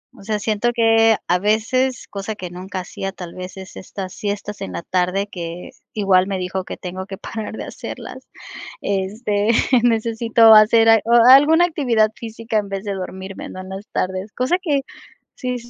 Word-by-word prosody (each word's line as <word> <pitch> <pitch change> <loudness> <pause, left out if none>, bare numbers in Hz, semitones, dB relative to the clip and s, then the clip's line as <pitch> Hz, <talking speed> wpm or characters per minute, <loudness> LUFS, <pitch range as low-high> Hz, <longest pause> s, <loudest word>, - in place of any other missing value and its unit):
O - - -15
sea, 215 +1 -1
siento 215 +3 0
que 225 -1 +4
a 180 +1 +2
veces, 225 +6 0
cosa 205 +2 -5
que 180 -4 -7
nunca 185 +1 -6
hacía, 195 +2 -6
tal 180 -3 -9
vez 185 +1 -8
es 190 -1 -10
estas 190 0 -7
siestas 205 0 -5
en 95 - -5
la 85 - -5
tarde 185 +2 0
que 175 -3 -7 0.2
igual 190 -3 +3
me 195 -1 -2
dijo 185 +1 -3
que - - -7
tengo 185 +1 -7
que 195 -1 -7
parar 220 +2 -6
de - - -5
hacerlas. - - -9 0.5
Este, 205 +2 -1 0.3
necesito 225 -1 +4
hacer 225 +1 +6
a 225 0 +7
o 230 - -1 0.2
alguna 310 +6 +7
actividad 245 -10 +1
física 225 -1 -4
en 205 -1 -5
vez 195 0 -4
de 205 -2 -3
dormirme, 190 0 -7
¿no?, 185 - -8
en 185 - -10
las 195 +3 -8
tardes. 190 +2 -3
Cosa 255 +8 +1
que 295 -6 0 0.5
sí, 250 -1 -3
205 Hz, 180 wpm, -20 LUFS, 190-225 Hz, 0.5 s, a